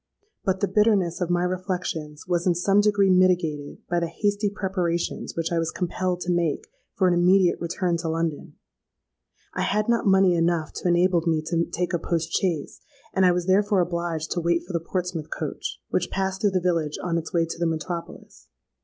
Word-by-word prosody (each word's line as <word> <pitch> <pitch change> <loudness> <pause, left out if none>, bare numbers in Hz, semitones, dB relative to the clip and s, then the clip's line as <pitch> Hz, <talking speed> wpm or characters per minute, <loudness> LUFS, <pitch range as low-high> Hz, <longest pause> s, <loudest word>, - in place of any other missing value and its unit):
But 190 -2 0
the 200 - +2
bitterness 195 -4 +2
of 175 - 0
my 175 0 +1
reflections 180 -5 -3
was 175 0 0
in 175 - +3
some 195 +4 +3
degree 205 -2 +3
mitigated 175 -6 +1
by 175 0 +1
the 170 - -1
hasty 205 +4 0
preparations 185 -4 -2
which 165 0 -2
I 170 - +1
was 165 -1 -1
compelled 180 0 -2
to 180 - -1
make 175 - 0 0.3
for 190 - +3
an 180 - +3
immediate 180 +1 +3
return 175 0 -1
to 165 -1 -3
London. 165 -2 -3 1.0
I - - -2
had 210 +1 0
not 235 -2 +1
money 190 -1 +5
enough 165 -2 0
to - - -2
enable 175 0 +3
me 160 -2 +1
to 170 +1 0
take 180 +1 -3
a 175 - +1
post 165 0 -2
chaise; 170 -6 -1 0.3
and 190 -1 +4
I - - +5
was 175 0 -1
therefore 195 +1 +3
obliged 170 -2 -2
to 175 - 0
wait 170 0 +1
for 180 - -8
the 170 - +1
Portsmouth 170 -2 -4
coach, - - -5
which - - 0
passed 190 0 -2
through 210 - +4
the 190 -1 +1
village 165 -4 0
on 170 -2 0
its 160 - -8
way 170 -1 +2
to 165 - -7
the 170 - +1
metropolis. 165 +1 -6
175 Hz, 195 wpm, -25 LUFS, 165-190 Hz, 1.0 s, money